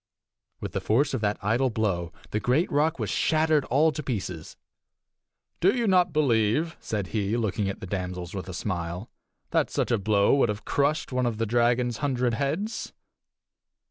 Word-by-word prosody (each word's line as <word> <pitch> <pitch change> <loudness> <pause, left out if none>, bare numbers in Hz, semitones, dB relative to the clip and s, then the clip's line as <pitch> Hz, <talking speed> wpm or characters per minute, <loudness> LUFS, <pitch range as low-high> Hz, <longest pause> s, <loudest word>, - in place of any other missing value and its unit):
With - - -5
the - - -2
force 135 +7 +2
of 130 - -1
that 105 -1 0
idle 120 +6 +2
blow 95 -7 -1 0.2
the 105 - 0
great 130 +10 +1
rock 155 +3 +2
was - - -2
shattered 155 -2 +2
all 150 +5 +3
to 150 - -5
pieces. 95 - -5 1.0
"Do 195 +6 +4
you 240 - +1
not 185 -3 +4
believe," 145 +2 +2
said 105 -4 -3
he, 105 +1 -1
looking 105 -3 -1
at 100 - -6
the - - -5
damsels 90 -2 -4
with 95 -1 -5
a - - -5
smile, 90 +1 -4 0.4
"that - - +2
such - - -1
a 115 - +2
blow 100 0 +3
would 130 - +3
have 105 0 -4
crushed 145 +2 0
one 125 -1 +1
of 115 -2 -2
the 115 - 0
dragon's 120 +1 +2
hundred 125 -4 0
heads?" 160 - -2
120 Hz, 175 wpm, -26 LUFS, 100-145 Hz, 1.0 s, Do